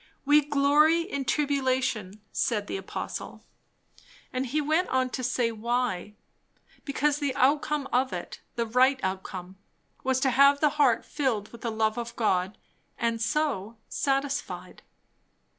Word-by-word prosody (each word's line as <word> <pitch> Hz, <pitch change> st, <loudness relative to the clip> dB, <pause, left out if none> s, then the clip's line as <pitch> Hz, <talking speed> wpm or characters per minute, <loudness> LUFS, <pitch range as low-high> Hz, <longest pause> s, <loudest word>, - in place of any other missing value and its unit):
"We 295 Hz, +1 st, +5 dB
glory 295 Hz, +3 st, +4 dB
in 280 Hz, -6 st, -4 dB
tribulation," 255 Hz, -9 st, 0 dB
said 210 Hz, -4 st, 0 dB
the -, -, -4 dB
apostle; 390 Hz, -, -6 dB, 0.9 s
and 255 Hz, +1 st, -1 dB
he 295 Hz, +6 st, 0 dB
went 315 Hz, +5 st, +1 dB
on 255 Hz, -1 st, +1 dB
to 255 Hz, -, -4 dB
say 240 Hz, -1 st, +1 dB
why; 225 Hz, -3 st, -2 dB, 0.7 s
because 290 Hz, +1 st, 0 dB
the 280 Hz, -3 st, -1 dB
outcome 285 Hz, +1 st, +2 dB
of 255 Hz, +1 st, +2 dB
it, -, -, -6 dB
the 235 Hz, -, 0 dB
right 255 Hz, +4 st, +3 dB
outcome, 190 Hz, 0 st, -5 dB, 0.4 s
was 260 Hz, 0 st, +1 dB
to 265 Hz, -, +3 dB
have 280 Hz, +2 st, +6 dB
the 300 Hz, -, +4 dB
heart 250 Hz, -5 st, +3 dB
filled 235 Hz, -8 st, -1 dB
with 235 Hz, -, -12 dB
the 235 Hz, -, -2 dB
love 220 Hz, +1 st, 0 dB
of 235 Hz, 0 st, -6 dB
God, 190 Hz, -3 st, 0 dB, 0.4 s
and 230 Hz, -1 st, -1 dB
so, 235 Hz, -5 st, -1 dB
satisfied. 280 Hz, +1 st, -2 dB
255 Hz, 140 wpm, -27 LUFS, 225-285 Hz, 0.9 s, have